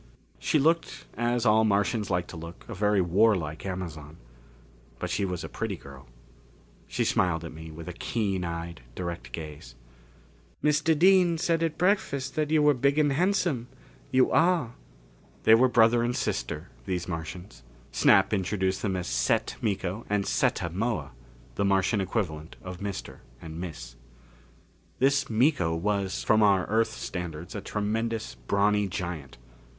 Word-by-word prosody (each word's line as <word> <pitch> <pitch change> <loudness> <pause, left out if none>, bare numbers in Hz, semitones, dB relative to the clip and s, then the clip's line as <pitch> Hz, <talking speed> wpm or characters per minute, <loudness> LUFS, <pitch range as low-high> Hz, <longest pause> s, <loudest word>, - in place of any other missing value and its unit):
She - - +1
looked, 165 +3 +1
as 120 0 0
all 110 0 +5
Martians 105 0 +1
like 90 -2 0
to - - -8
look, 85 +1 -9
a 115 - -6
very 105 0 +2
warlike 90 -3 +2
Amazon. 80 -5 -6 0.8
But - - -4
she 100 - 0
was 90 -3 -3
a - - -4
pretty - - -3
girl. 70 -1 -13 0.8
She - - -1
smiled 85 -2 +1
at 85 - -7
me 80 +1 -9
with 80 +1 -9
a 90 - -5
keen 100 -1 -2
eyed, 85 0 -5
direct 85 -9 -5
gaze. 75 +1 -8 0.9
"Mr. 150 +1 +3
Dean 180 0 +5
said 165 0 +1
at 165 -2 -1
breakfast 140 -8 +1
that 155 -2 -1
you 155 -1 +3
were 150 0 +6
big 140 +3 +1
and 150 -2 +3
handsome. 175 -7 +1 0.4
You 130 0 +3
are." 165 -8 +3 0.7
They 110 - +7
were 125 +3 +6
brother 120 -1 +4
and 120 +1 0
sister, 75 +8 -3 0.2
these 90 -2 -2
Martians. 90 0 -6 0.3
Snap - - +4
introduced 95 -1 0
them 100 -3 -1
as 90 -1 -3
Set - - 0
Miko 100 0 -2
and 100 -1 +1
Setta 85 - 0
Moa 110 +4 -2 0.4
the 100 - -1
Martian 100 +1 +2
equivalent 80 -6 -3
of 90 -1 -7
Mr. 100 -1 -5 0.2
and 80 +1 -8
Miss. 65 -9 -7 1.0
This 140 +1 +2
Miko 115 - +2
was, 100 +2 -1
from 110 0 +4
our 100 -3 +4
Earth 110 +1 +2
standards, 85 -2 -6
a 105 - -4
tremendous, 110 +3 -2
brawny 100 +11 +1
giant. 85 -7 -5
100 Hz, 150 wpm, -27 LUFS, 85-120 Hz, 1.0 s, They